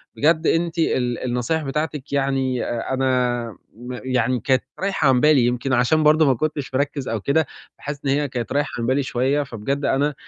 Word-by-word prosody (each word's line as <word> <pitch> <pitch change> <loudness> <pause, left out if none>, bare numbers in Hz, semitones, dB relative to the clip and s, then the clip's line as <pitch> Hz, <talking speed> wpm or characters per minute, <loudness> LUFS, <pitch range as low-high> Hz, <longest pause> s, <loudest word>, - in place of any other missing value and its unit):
بجد 160 +2 +2
أنتِ 170 0 +1
ال 125 -6 0
النصايح 125 +6 -1
بتاعتِك 150 0 -3
يعني 135 -2 0
آآ 120 +2 -3
أنا 125 -2 +1 0.3
م 125 +3 -8
يعني 125 -1 0
كانت 130 +2 +1 0.2
رايحة 195 -6 0
عن 125 - +4
بالي، 150 -5 +5
يمكن 125 +2 -1
عشان 130 +6 +3
برضه 155 +1 +5
ما 135 - +4
كنتش 145 0 -3
مركّز 140 0 -1
أو 115 -2 -2
كده، 140 +6 +2 0.3
فحاسس 145 0 -7
إن 135 - +1
هي 145 +1 +1
كانت 120 -4 -5
رايحة 145 +1 +1
عن 115 - -1
بالي 135 +3 +1
شوية، 135 +4 0
فبجد 135 +3 -3
أنا 145 +2 +1
135 Hz, 185 wpm, -22 LUFS, 125-150 Hz, 0.3 s, بالي